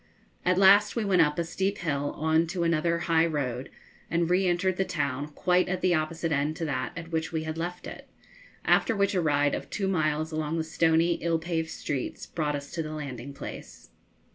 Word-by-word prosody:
At 180 0 +2
last 200 +2 +6
we 230 -3 0
went 185 -3 +4
up 150 -2 +2
a 170 - +1
steep 190 +4 -2
hill 145 -4 -2
on 160 +2 +2
to 175 +1 -2
another 170 0 +2
high 165 0 +3
road, 135 -5 -3 0.4
and 170 +1 +1
re 185 +1 +3
entered 180 +1 +1
the 190 - +2
town 145 -5 -2
quite 180 +5 +1
at 185 0 -2
the 185 - +3
opposite 160 +1 -1
end 150 +1 0
to 165 - -3
that 130 -4 -2
at 165 0 -7
which 160 +1 -1
we 160 -1 -2
had 155 0 -4
left 175 +2 -4
it, - - -9 0.6
after 230 - +3
which 200 0 +1
a 185 - +2
ride 145 -2 +2
of - - -4
two 195 -2 -2
miles 155 -3 0
along 155 +1 -2
the 160 - 0
stony, 165 +1 +2
ill 165 -1 +1
paved 160 -1 -2
streets 140 -5 -4
brought 150 -3 -2
us 145 0 -7
to 165 - -3
the 155 -1 -5
landing 140 -3 -6
place. - - -9
165 Hz, 210 wpm, -27 LUFS, 150-175 Hz, 0.6 s, last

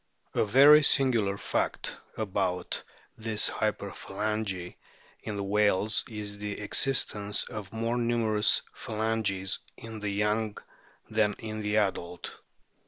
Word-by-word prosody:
A - - +2
very 140 +8 +8
singular 120 -9 +3
fact - - -2 0.2
about 95 -4 -1 0.4
this 110 -1 0
hyperphalangy 100 -3 -3 0.5
in 105 - -5
the 100 - -2
whales 105 +1 +2
is 105 -2 -6
the 105 -1 -4
existence 105 -3 +2
of 105 -3 -7
more 115 +2 -1
numerous 115 -3 +2
phalanges 110 -3 -1 0.2
in 110 -1 -8
the 105 -1 -2
young 105 +1 0 0.5
than 110 -1 +1
in 110 -1 -6
the 105 0 0
adult. 90 -4 -2
105 Hz, 110 wpm, -29 LUFS, 100-110 Hz, 0.5 s, very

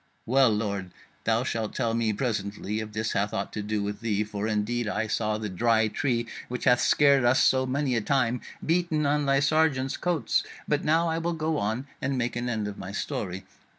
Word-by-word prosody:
Well, 130 +1 +4
lord, 100 -3 -2 0.4
thou 115 +1 +2
shalt 115 -4 -3
tell 115 -1 0
me 115 -1 +1
presently 105 -2 -2
if 110 -1 -5
this 110 +1 -2
hath 105 +2 -1
aught 100 - -3
to 105 - -3
do 105 0 -2
with 100 0 -4
thee: 105 -2 0
for 105 0 -4
indeed 110 +2 -1
I 105 +1 -1
saw 105 0 -1
the 110 -1 -4
Dry 110 +3 +2
Tree, 120 -1 0 0.2
which 125 0 -5
hath 125 -1 +4
scared 140 -3 +4
us 120 +2 +4
so 130 0 +3
many 135 -1 0
a 115 - +1
time, 125 0 +1 0.2
beaten 165 -2 +1
on 145 0 +1
thy 135 0 +4
sergeants' 145 -3 +2
coats; 170 -9 0 0.2
but 150 0 +1
now 165 +2 +3
I 165 0 0
will 170 +1 -1
go 160 -1 -1
on 110 +6 -2 0.2
and 135 0 -1
make 120 -1 -1
an 120 0 -2
end 110 -3 -1
of 105 - -7
my 95 - -6
story." 95 -2 -4
115 Hz, 210 wpm, -27 LUFS, 105-135 Hz, 0.4 s, Well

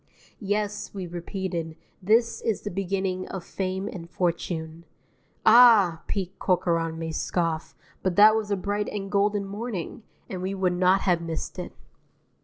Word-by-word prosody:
Yes, 205 0 -2
we 190 -2 -4
repeated, 175 -1 -4 0.2
this 225 +5 +2
is 225 -3 -1
the 205 - -5
beginning 190 0 -2
of 190 -2 -6
fame 190 +1 -3
and 170 -5 -7
fortune. 170 -2 -2 0.6
Ah! 215 -7 +7
Pete 190 -2 -4
Corcoran 165 -3 +1
may 165 0 -4
scoff, 165 0 -2 0.3
but 185 -2 0
that 215 +2 +8
was 220 -2 -1
a 200 - +1
bright 205 +2 -2
and 195 -1 -5
golden 205 0 +1
morning, 205 -1 -5 0.3
and 185 -2 -5
we 190 +2 -2
would 185 -2 +1
not 185 +2 +3
have 175 -3 +2
missed 165 -1 -5
it. - - -6
190 Hz, 150 wpm, -26 LUFS, 175-205 Hz, 0.6 s, that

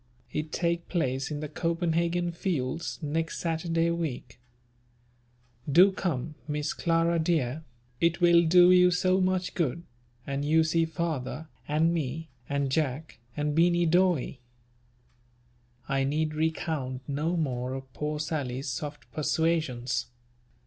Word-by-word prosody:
It 155 0 -3
take 170 -1 -1
place 135 -6 -1
in 150 -1 -4
the 150 - -3
copandhagen 170 +2 0
fields, 165 -3 -2
next 160 +2 -2
Saturday 165 0 0
week. 160 -8 -4 1.3
Do 180 +7 +7
come, 160 -6 -2
Miss 150 0 -2
Clara 165 0 +1
dear, 160 -3 0 0.4
it 170 +1 +2
will 170 -1 +6
do 180 +2 +7
you 180 0 +6
so 185 +1 +2
much 185 0 0
good, 170 0 -1 0.4
and 140 0 -2
you 160 +2 +4
see 165 +1 +2
father, 160 -3 -3 0.2
and 160 +3 +2
me, 160 0 -3 0.2
and 140 -1 0
Jack, 145 -1 -2 0.2
and 150 0 0
Beany 175 +2 +3
Dawe." 170 -6 +2 1.5
I 135 -1 +1
need 155 +3 0
recount 155 -4 -2
no 155 +5 -1
more 130 -4 -2
of 135 -1 -9
poor 150 0 -3
Sally's 140 -4 -3
soft 145 +3 -5
persuasions. 145 -6 0
160 Hz, 125 wpm, -28 LUFS, 140-170 Hz, 1.5 s, Do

